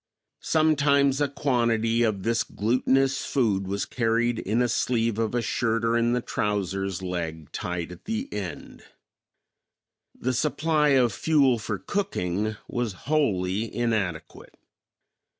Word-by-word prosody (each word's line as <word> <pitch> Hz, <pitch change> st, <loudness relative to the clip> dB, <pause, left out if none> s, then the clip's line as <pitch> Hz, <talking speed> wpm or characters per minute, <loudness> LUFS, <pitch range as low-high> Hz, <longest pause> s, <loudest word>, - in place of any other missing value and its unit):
Sometimes 140 Hz, -3 st, +3 dB
a 145 Hz, -, +3 dB
quantity 120 Hz, -5 st, +1 dB
of 105 Hz, -5 st, 0 dB
this 115 Hz, 0 st, +1 dB
glutenous 130 Hz, +5 st, +1 dB
food 105 Hz, -8 st, 0 dB
was 100 Hz, +1 st, -2 dB
carried 115 Hz, 0 st, 0 dB
in 110 Hz, +4 st, -1 dB
a -, -, +2 dB
sleeve 115 Hz, -1 st, 0 dB
of 115 Hz, +1 st, -1 dB
a 120 Hz, -, 0 dB
shirt 115 Hz, 0 st, 0 dB
or 115 Hz, 0 st, +2 dB
in 120 Hz, 0 st, +2 dB
the 125 Hz, -, 0 dB
trouser's 95 Hz, -2 st, -2 dB
leg 80 Hz, -4 st, -4 dB
tied 90 Hz, -1 st, -4 dB
at 90 Hz, +2 st, -12 dB
the 225 Hz, +5 st, -2 dB
end. 95 Hz, -4 st, -6 dB, 1.3 s
The 130 Hz, +1 st, -2 dB
supply 150 Hz, +3 st, +1 dB
of 120 Hz, -4 st, +3 dB
fuel 140 Hz, -5 st, +3 dB
for 105 Hz, -1 st, -3 dB
cooking 110 Hz, -, -2 dB
was 120 Hz, -4 st, -2 dB
wholly 110 Hz, -8 st, 0 dB
inadequate. 105 Hz, -9 st, -3 dB
115 Hz, 130 wpm, -26 LUFS, 100-135 Hz, 1.3 s, Sometimes